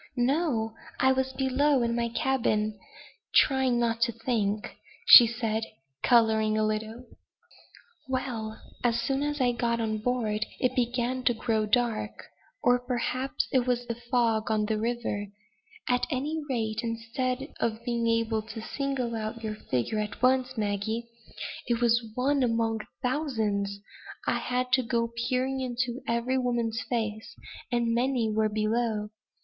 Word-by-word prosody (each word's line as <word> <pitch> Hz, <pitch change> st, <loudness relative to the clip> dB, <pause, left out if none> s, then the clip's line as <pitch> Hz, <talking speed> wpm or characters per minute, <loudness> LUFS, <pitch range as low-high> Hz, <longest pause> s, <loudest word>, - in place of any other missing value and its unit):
"No! 245 Hz, -3 st, +1 dB, 0.3 s
I 265 Hz, -, +5 dB
was 265 Hz, 0 st, 0 dB
below 265 Hz, +1 st, +2 dB
in 235 Hz, 0 st, 0 dB
my 235 Hz, 0 st, 0 dB
cabin 215 Hz, -4 st, 0 dB, 0.6 s
trying 265 Hz, -3 st, +4 dB
not 230 Hz, -1 st, 0 dB
to 235 Hz, 0 st, +3 dB
think," 220 Hz, -3 st, -2 dB, 0.3 s
said 230 Hz, -2 st, +8 dB
she, -, -, -10 dB, 0.3 s
coloring 220 Hz, -3 st, +4 dB
a 215 Hz, -, +2 dB
little. 220 Hz, +3 st, -3 dB, 1.0 s
"Well! 230 Hz, -4 st, -3 dB, 0.2 s
as 235 Hz, -1 st, +2 dB
soon 270 Hz, +3 st, 0 dB
as 295 Hz, 0 st, -1 dB
I 250 Hz, -2 st, +3 dB
got 235 Hz, -1 st, 0 dB
on 220 Hz, -1 st, -1 dB
board 220 Hz, -2 st, 0 dB, 0.2 s
it 255 Hz, -, +1 dB
began 245 Hz, +1 st, 0 dB
to 240 Hz, -, +3 dB
grow 220 Hz, -1 st, 0 dB
dark, 215 Hz, -2 st, -1 dB, 0.3 s
or, 245 Hz, 0 st, +4 dB
perhaps, 255 Hz, +2 st, -2 dB
it 255 Hz, -2 st, +2 dB
was 245 Hz, -1 st, 0 dB
the 235 Hz, -, -2 dB
fog 235 Hz, -2 st, 0 dB
on 215 Hz, -1 st, +1 dB
the 215 Hz, 0 st, -1 dB
river; 230 Hz, -3 st, -2 dB, 0.6 s
at 250 Hz, 0 st, +1 dB
any 300 Hz, +3 st, -2 dB
rate, 220 Hz, -4 st, -1 dB
instead 250 Hz, +4 st, -3 dB
of 230 Hz, 0 st, -2 dB
being 235 Hz, -1 st, 0 dB
able 230 Hz, -1 st, +1 dB
to 225 Hz, +1 st, -8 dB
single 260 Hz, 0 st, -2 dB
out 220 Hz, +1 st, -4 dB
your 215 Hz, -1 st, -2 dB
figure 210 Hz, -, -2 dB
at 210 Hz, -1 st, -4 dB
once, 255 Hz, 0 st, +3 dB
Maggie 220 Hz, +3 st, -2 dB, 0.6 s
it 235 Hz, -1 st, +1 dB
is 235 Hz, 0 st, +4 dB
one 275 Hz, +2 st, +2 dB
among 230 Hz, -2 st, +1 dB
a -, -, -20 dB
thousand 225 Hz, -8 st, 0 dB, 0.6 s
I -, -, +1 dB
had 250 Hz, 0 st, -1 dB
to 260 Hz, -, +5 dB
go 230 Hz, -1 st, -1 dB, 0.2 s
peering 260 Hz, +1 st, 0 dB
into 255 Hz, 0 st, -2 dB
every 235 Hz, +3 st, +1 dB
woman's 240 Hz, -2 st, -1 dB
face; 220 Hz, -3 st, -3 dB, 0.4 s
and 235 Hz, -1 st, +1 dB
many 240 Hz, -2 st, +1 dB
were 215 Hz, 0 st, +2 dB
below. 215 Hz, 0 st, 0 dB
235 Hz, 145 wpm, -28 LUFS, 220-255 Hz, 1.0 s, said